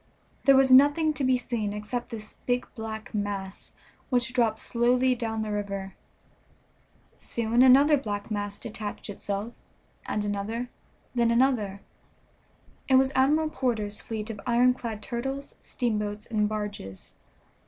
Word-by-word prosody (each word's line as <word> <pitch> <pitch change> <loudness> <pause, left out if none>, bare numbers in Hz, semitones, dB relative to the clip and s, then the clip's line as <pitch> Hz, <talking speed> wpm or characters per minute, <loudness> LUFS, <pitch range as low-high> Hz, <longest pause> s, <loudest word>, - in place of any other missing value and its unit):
There 275 - +7
was 265 0 +5
nothing 290 +4 +6
to 290 - -3
be 260 -1 +3
seen 230 -4 -3
except 210 +4 -4
this 215 -3 -8
big 245 0 0
black 220 +1 -7
mass, 200 -2 -4 0.4
which 245 -1 +1
dropped 230 -3 +2
slowly 250 +3 +2
down 225 -2 -2
the 215 - -4
river. 200 -2 -4 1.2
Soon 235 +1 0
another 275 +4 +7
black 205 -4 -4
mass 205 -1 -3
detached 215 -1 -6
itself, 205 +3 -4 0.5
and 210 0 -1
another, 215 +4 -3 0.4
then 235 -2 +2
another. 235 -5 +1 1.1
It 265 - +4
was 265 0 +4
Admiral 305 +4 +3
Porter's 220 -8 -2
fleet 220 0 -4
of 210 -2 -8
ironclad 240 -3 +1
turtles, 270 +5 -4
steamboats, 210 -4 -2
and 210 -2 0
barges. 205 - -6
230 Hz, 130 wpm, -27 LUFS, 210-255 Hz, 1.2 s, There